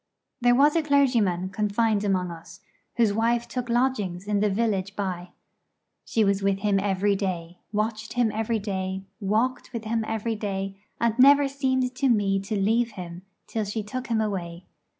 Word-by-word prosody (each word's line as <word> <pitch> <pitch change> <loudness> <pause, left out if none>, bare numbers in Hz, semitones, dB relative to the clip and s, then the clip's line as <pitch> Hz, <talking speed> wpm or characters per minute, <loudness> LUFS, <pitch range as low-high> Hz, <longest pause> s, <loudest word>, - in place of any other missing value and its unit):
There 245 0 +5
was 290 +4 +5
a 330 - +4
clergyman 240 - +2
confined 210 +1 +1
among 185 -3 0
us, 170 0 -12 0.3
whose 225 -4 +3
wife 235 +2 +1
took 250 -1 -4
lodgings 215 -7 0
in 205 -1 +1
the 210 +1 +2
village 200 -2 -1
by. 180 -3 -3 0.8
She 225 - +1
was 200 -1 +2
with 195 0 +1
him 205 -1 +2
every 200 0 +1
day, 180 -3 -4
watched 215 +1 -2
him 240 -3 +2
every 225 +1 -1
day, 190 -2 -3 0.2
walked 220 +5 0
with 230 -2 -5
him 225 0 -1
every 225 +1 -2
day, 195 -2 -3 0.2
and 235 -1 +2
never 280 +2 +7
seemed 260 -2 0
to 270 +1 +1
me 200 -4 +2
to 195 +3 -4
leave 225 +3 +1
him 175 -1 -8 0.2
till 220 - -2
she 210 +2 -3
took 255 +5 -5
him 230 -2 +1
away. 180 -4 -4
210 Hz, 170 wpm, -25 LUFS, 195-235 Hz, 0.8 s, never